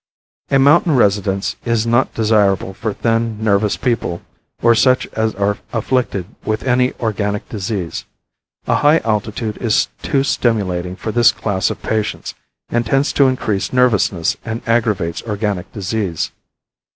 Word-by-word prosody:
A 135 Hz, -, +4 dB
mountain 145 Hz, +3 st, +4 dB
residence 100 Hz, -3 st, +1 dB
is 115 Hz, -2 st, 0 dB
not 120 Hz, +3 st, +2 dB
desirable 105 Hz, -4 st, +2 dB
for 110 Hz, +3 st, -3 dB
thin, 115 Hz, +1 st, -1 dB
nervous 105 Hz, -1 st, +2 dB
people 110 Hz, -8 st, -2 dB, 0.4 s
or 115 Hz, 0 st, +6 dB
such 130 Hz, +2 st, +3 dB
as 110 Hz, 0 st, -1 dB
are 100 Hz, +1 st, 0 dB
afflicted 115 Hz, -5 st, -1 dB, 0.2 s
with 110 Hz, 0 st, -2 dB
any 125 Hz, 0 st, +2 dB
organic 105 Hz, -2 st, -2 dB
disease. 100 Hz, -4 st, -4 dB, 0.6 s
A -, -, +2 dB
high 150 Hz, +2 st, +5 dB
altitude 110 Hz, 0 st, -2 dB
is 115 Hz, -3 st, +1 dB
too 135 Hz, -1 st, +1 dB
stimulating 95 Hz, -9 st, 0 dB
for 110 Hz, -, -4 dB
this 120 Hz, 0 st, +5 dB
class 95 Hz, -3 st, -1 dB
of -, -, -6 dB
patients 110 Hz, -1 st, -2 dB, 0.4 s
and 120 Hz, 0 st, +1 dB
tends 135 Hz, +5 st, +1 dB
to 140 Hz, -, +4 dB
increase 110 Hz, -6 st, -1 dB
nervousness 105 Hz, -9 st, +2 dB
and 115 Hz, 0 st, -5 dB
aggravates 110 Hz, -8 st, 0 dB
organic 105 Hz, -4 st, -3 dB
disease. 100 Hz, -4 st, -2 dB
110 Hz, 140 wpm, -18 LUFS, 100-120 Hz, 0.6 s, or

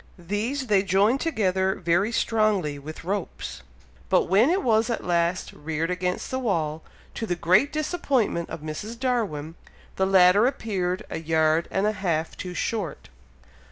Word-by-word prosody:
These 210 Hz, +10 st, -2 dB
they 205 Hz, -5 st, +3 dB
joined 200 Hz, +7 st, +2 dB
together 190 Hz, -, +1 dB
very 175 Hz, +5 st, +1 dB
strongly 210 Hz, -11 st, +1 dB
with 155 Hz, +3 st, -9 dB
ropes, 195 Hz, +1 st, -4 dB, 0.5 s
but -, -, +4 dB
when 210 Hz, -, +4 dB
it 370 Hz, +3 st, +1 dB
was 225 Hz, -1 st, +2 dB
at 235 Hz, -, -2 dB
last 175 Hz, +1 st, 0 dB
reared 160 Hz, +3 st, -3 dB
against 180 Hz, 0 st, -2 dB
the 260 Hz, -, -1 dB
wall, 160 Hz, -10 st, -1 dB, 0.3 s
to 225 Hz, -, -4 dB
the 175 Hz, -, 0 dB
great 185 Hz, -, +3 dB
disappointment 280 Hz, -, 0 dB
of -, -, -6 dB
Mrs. 205 Hz, +10 st, -6 dB
Darwin, 210 Hz, -, -1 dB, 0.4 s
the 190 Hz, -, +2 dB
ladder 190 Hz, +3 st, +6 dB
appeared 190 Hz, -8 st, -2 dB
a 160 Hz, -, -3 dB
yard 160 Hz, 0 st, +2 dB
and 195 Hz, -, 0 dB
a 210 Hz, -, +3 dB
half 170 Hz, -6 st, -2 dB
too 180 Hz, -1 st, -6 dB
short! 200 Hz, -1 st, -3 dB
190 Hz, 155 wpm, -25 LUFS, 170-225 Hz, 0.5 s, ladder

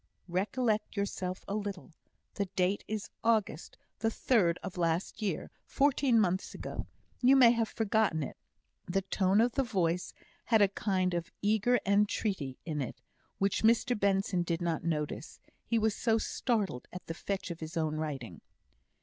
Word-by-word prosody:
"Recollect 210 Hz, +4 st, 0 dB
yourself 185 Hz, -2 st, -3 dB
a -, -, -3 dB
little. 200 Hz, -3 st, -4 dB, 0.4 s
The 200 Hz, -, -1 dB
date 185 Hz, +2 st, +1 dB
is 215 Hz, -1 st, -4 dB
August 215 Hz, -8 st, 0 dB, 0.2 s
the 225 Hz, -, +2 dB
third 200 Hz, -7 st, +2 dB
of 185 Hz, -, -6 dB
last 170 Hz, +4 st, -1 dB
year, 195 Hz, -7 st, -2 dB
fourteen 275 Hz, -4 st, +3 dB
months 185 Hz, -2 st, 0 dB
ago. -, -, -6 dB, 0.3 s
You 260 Hz, +2 st, +6 dB
may 250 Hz, -3 st, +8 dB
have 230 Hz, -2 st, 0 dB
forgotten 215 Hz, -7 st, +1 dB
it." -, -, -6 dB, 0.5 s
The 195 Hz, +2 st, 0 dB
tone 190 Hz, +1 st, +2 dB
of 240 Hz, +2 st, +4 dB
the 275 Hz, -, +1 dB
voice 180 Hz, -8 st, 0 dB, 0.3 s
had 225 Hz, -2 st, +4 dB
a 200 Hz, -2 st, +5 dB
kind 185 Hz, -2 st, 0 dB
of 170 Hz, 0 st, -3 dB
eager 220 Hz, +4 st, +3 dB
entreaty 200 Hz, -, +1 dB
in 155 Hz, -3 st, -2 dB
it, 130 Hz, -, -5 dB, 0.4 s
which 195 Hz, 0 st, +1 dB
Mr 230 Hz, +2 st, +3 dB
Benson 195 Hz, -2 st, +1 dB
did 170 Hz, -1 st, -1 dB
not 170 Hz, -2 st, -1 dB
notice, 150 Hz, -3 st, -3 dB, 0.3 s
he 230 Hz, -, +2 dB
was 220 Hz, -1 st, +2 dB
so 225 Hz, -2 st, +2 dB
startled 215 Hz, -, -1 dB
at 180 Hz, -, -8 dB
the 165 Hz, -, -4 dB
fetch 195 Hz, +2 st, -4 dB
of 170 Hz, -, -6 dB
his 160 Hz, +1 st, -6 dB
own 155 Hz, -1 st, 0 dB
writing. 135 Hz, -, -5 dB
195 Hz, 160 wpm, -31 LUFS, 170-220 Hz, 0.5 s, may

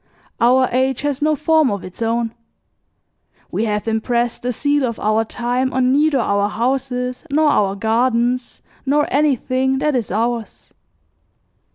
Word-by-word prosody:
Our 255 Hz, +2 st, +4 dB
age 260 Hz, +1 st, 0 dB
has 290 Hz, -1 st, -2 dB
no 305 Hz, +1 st, +2 dB
form 310 Hz, -1 st, +3 dB
of 200 Hz, -2 st, -3 dB
its 185 Hz, +4 st, -10 dB
own. 230 Hz, 0 st, -1 dB, 1.2 s
We 225 Hz, -, -1 dB
have 210 Hz, 0 st, -2 dB
impressed 235 Hz, +2 st, -1 dB
the 250 Hz, -, -1 dB
seal 285 Hz, +3 st, 0 dB
of 230 Hz, -3 st, -2 dB
our 215 Hz, +1 st, +1 dB
time 245 Hz, +3 st, -2 dB
on 255 Hz, 0 st, +2 dB
neither 295 Hz, +1 st, +3 dB
our 200 Hz, -4 st, +1 dB
houses 250 Hz, +1 st, -2 dB
nor 300 Hz, +2 st, +3 dB
our 195 Hz, -6 st, +1 dB
gardens 240 Hz, +3 st, 0 dB, 0.2 s
nor 290 Hz, +2 st, +2 dB
anything 265 Hz, -2 st, +1 dB
that 300 Hz, +1 st, 0 dB
is 235 Hz, -4 st, -1 dB
ours. 230 Hz, +2 st, -3 dB
250 Hz, 145 wpm, -19 LUFS, 230-270 Hz, 1.2 s, Our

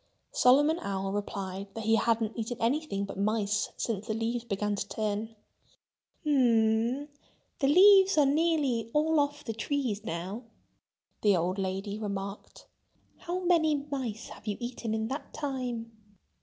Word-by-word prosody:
Solomon 290 Hz, +6 st, +4 dB
Owl 195 Hz, -, -3 dB
replied 195 Hz, -1 st, -4 dB
that 225 Hz, -, -4 dB
he 220 Hz, +1 st, +2 dB
hadn't 225 Hz, -1 st, +1 dB
eaten 230 Hz, +1 st, -3 dB
anything 230 Hz, -5 st, 0 dB
but 195 Hz, -1 st, -7 dB
mice 210 Hz, 0 st, 0 dB
since 215 Hz, -2 st, -3 dB
the 220 Hz, -, -1 dB
leaves 230 Hz, +1 st, -2 dB
began 210 Hz, -2 st, -1 dB
to 200 Hz, 0 st, -4 dB
turn. 215 Hz, 0 st, -2 dB
"H 225 Hz, 0 st, -24 dB, 0.9 s
m—the 255 Hz, +2 st, 0 dB
leaves 385 Hz, +3 st, +7 dB
are 295 Hz, -, +6 dB
nearly 280 Hz, -6 st, +1 dB
all 310 Hz, +1 st, +3 dB
off 290 Hz, 0 st, -1 dB
the 225 Hz, -, -4 dB
trees 225 Hz, -2 st, -2 dB
now," 190 Hz, +2 st, -4 dB, 0.8 s
the 205 Hz, -3 st, +4 dB
old 180 Hz, +3 st, -1 dB
lady 195 Hz, +2 st, -3 dB
remarked. 200 Hz, -1 st, -6 dB, 0.5 s
"How 360 Hz, +1 st, -4 dB
many 335 Hz, -4 st, +3 dB, 0.2 s
mice 245 Hz, -6 st, -4 dB
have -, -, -13 dB
you 205 Hz, -, -1 dB
eaten 240 Hz, -2 st, -3 dB
in 220 Hz, 0 st, -1 dB
that 275 Hz, +2 st, -6 dB
time?" 250 Hz, -5 st, -3 dB
225 Hz, 140 wpm, -29 LUFS, 205-285 Hz, 0.9 s, leaves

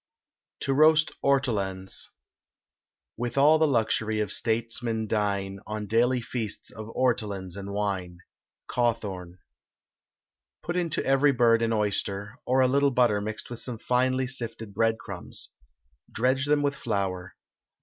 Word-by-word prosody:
TO 135 Hz, -, 0 dB
ROAST 155 Hz, +2 st, +5 dB
ORTOLANS. 100 Hz, -9 st, -1 dB, 1.1 s
With 120 Hz, +2 st, -4 dB
all 150 Hz, +3 st, +6 dB
the 160 Hz, -, +4 dB
luxury 110 Hz, -4 st, +1 dB
of 105 Hz, -2 st, 0 dB
statesmen 115 Hz, 0 st, +1 dB
dine, 100 Hz, -2 st, -1 dB
On 105 Hz, 0 st, -4 dB
daily 120 Hz, +4 st, +2 dB
feasts 115 Hz, -3 st, -4 dB
of 110 Hz, -1 st, -8 dB
ortolans 100 Hz, -8 st, 0 dB
and 100 Hz, 0 st, -6 dB
wine. 95 Hz, -4 st, -2 dB, 0.5 s
CAWTHORN. 100 Hz, -7 st, -2 dB, 1.3 s
Put 175 Hz, -, -3 dB
into 175 Hz, -3 st, -1 dB
every 135 Hz, +2 st, +4 dB
bird 115 Hz, -2 st, +4 dB
an 115 Hz, 0 st, +1 dB
oyster, 105 Hz, 0 st, -1 dB
or 130 Hz, +1 st, +3 dB
a 130 Hz, -, +5 dB
little 140 Hz, +2 st, +3 dB
butter 120 Hz, -5 st, +2 dB
mixed 110 Hz, +3 st, -4 dB
with 120 Hz, -, -4 dB
some 125 Hz, -3 st, -3 dB
finely 130 Hz, +2 st, +1 dB
sifted 115 Hz, -4 st, -5 dB
breadcrumbs. 115 Hz, +1 st, -2 dB, 0.6 s
Dredge 130 Hz, +4 st, +1 dB
them 145 Hz, 0 st, +3 dB
with 140 Hz, 0 st, +1 dB
flour. 100 Hz, -8 st, -3 dB
115 Hz, 130 wpm, -27 LUFS, 105-130 Hz, 1.3 s, all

